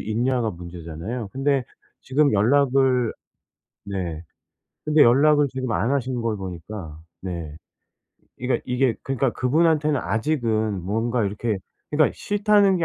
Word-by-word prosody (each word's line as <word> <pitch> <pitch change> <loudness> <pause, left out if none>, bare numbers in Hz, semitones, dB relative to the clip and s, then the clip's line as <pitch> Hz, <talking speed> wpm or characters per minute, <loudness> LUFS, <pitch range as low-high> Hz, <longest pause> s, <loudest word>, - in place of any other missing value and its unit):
있냐가 120 +1 0
문제잖아요. 85 +5 -6
근데 135 -1 +1 0.4
지금 145 +2 +2
연락을 130 +2 +3 0.7
네 90 -5 -4 0.6
근데 150 0 +5
연락을 145 +4 +5
지금 130 -1 -4
안 115 - 0
하시는 130 -3 -1
걸 115 -2 -1
보니까 90 -3 -7 0.2
네 85 -5 -5 0.8
이가 125 +1 0
이게 125 -2 +1
그니까 135 -1 0
그분한테는 150 +2 +2
아직은 110 - 0
뭔가 115 +4 0
이렇게 105 +1 -2 0.3
그니까 150 0 +3
싫다는 205 -1 +3
게 170 - 0
125 Hz, 275 characters per minute, -23 LUFS, 100-140 Hz, 0.8 s, 근데